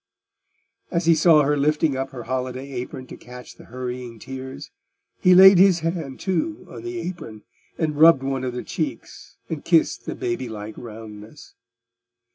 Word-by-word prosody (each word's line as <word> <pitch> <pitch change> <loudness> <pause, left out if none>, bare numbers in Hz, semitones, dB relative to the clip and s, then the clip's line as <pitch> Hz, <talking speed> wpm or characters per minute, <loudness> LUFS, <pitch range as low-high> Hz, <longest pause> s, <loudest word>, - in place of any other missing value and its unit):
As 170 -1 -1
he 165 - +6
saw 160 -1 +5
her 145 +1 +1
lifting 150 0 +1
up 135 0 -3
her 130 -3 -8
holiday 130 +2 -4
apron 130 0 -6
to - - -10
catch 125 0 -12
the - - -16
hurrying 125 -1 -6
tears, 130 +4 -9 0.5
he 180 0 +5
laid 190 0 +9
his 185 -3 +5
hand, 165 -5 -4
too, 305 - -2
on - - -10
the 360 0 -6
apron, 115 - -7 0.3
and 155 -3 -1
rubbed 160 -4 +7
one 135 -1 -2
of 125 -1 -3
the 125 - -5
cheeks - - -6
and 155 -3 -5
kissed 165 -2 +1
the - - -4
baby 180 -9 -3
like 110 0 -7
roundness. 110 +1 -11
135 Hz, 165 wpm, -23 LUFS, 125-165 Hz, 0.5 s, laid